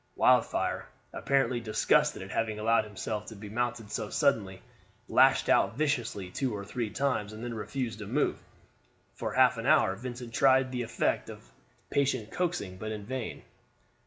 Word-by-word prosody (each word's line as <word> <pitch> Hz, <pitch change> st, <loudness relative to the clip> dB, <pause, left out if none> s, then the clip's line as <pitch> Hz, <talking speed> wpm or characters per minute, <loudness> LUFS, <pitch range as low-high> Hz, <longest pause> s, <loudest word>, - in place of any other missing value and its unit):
Wildfire, -, -, +2 dB, 0.3 s
apparently 130 Hz, -3 st, +1 dB
disgusted 110 Hz, -2 st, +2 dB
at -, -, -9 dB
having 110 Hz, -2 st, -1 dB
allowed 110 Hz, +1 st, +2 dB
himself 105 Hz, +1 st, -5 dB
to 110 Hz, -, -8 dB
be 105 Hz, 0 st, -9 dB
mounted 120 Hz, -1 st, -2 dB
so 110 Hz, -1 st, -3 dB
suddenly, 105 Hz, -10 st, 0 dB, 0.4 s
lashed -, -, +4 dB
out -, -, +3 dB
viciously 120 Hz, -11 st, -1 dB
two 125 Hz, +1 st, -2 dB
or 100 Hz, -1 st, -6 dB
three 115 Hz, +1 st, -3 dB
times, 110 Hz, -2 st, -1 dB
and 110 Hz, +2 st, -8 dB
then 120 Hz, -1 st, -4 dB
refused 115 Hz, 0 st, -4 dB
to 105 Hz, -, -7 dB
move. 140 Hz, +7 st, 0 dB, 0.7 s
For -, -, -4 dB
half -, -, +4 dB
an -, -, -3 dB
hour 95 Hz, -, +4 dB
Vincent 120 Hz, +1 st, -7 dB
tried 130 Hz, 0 st, +4 dB
the 125 Hz, -1 st, -2 dB
effect 115 Hz, -, -1 dB
of -, -, -12 dB, 0.4 s
patient 130 Hz, -6 st, 0 dB
coaxing, 165 Hz, -, -2 dB
but 110 Hz, +3 st, -5 dB
in 105 Hz, -2 st, -6 dB
vain. 130 Hz, 0 st, -5 dB
115 Hz, 160 wpm, -29 LUFS, 105-130 Hz, 0.7 s, lashed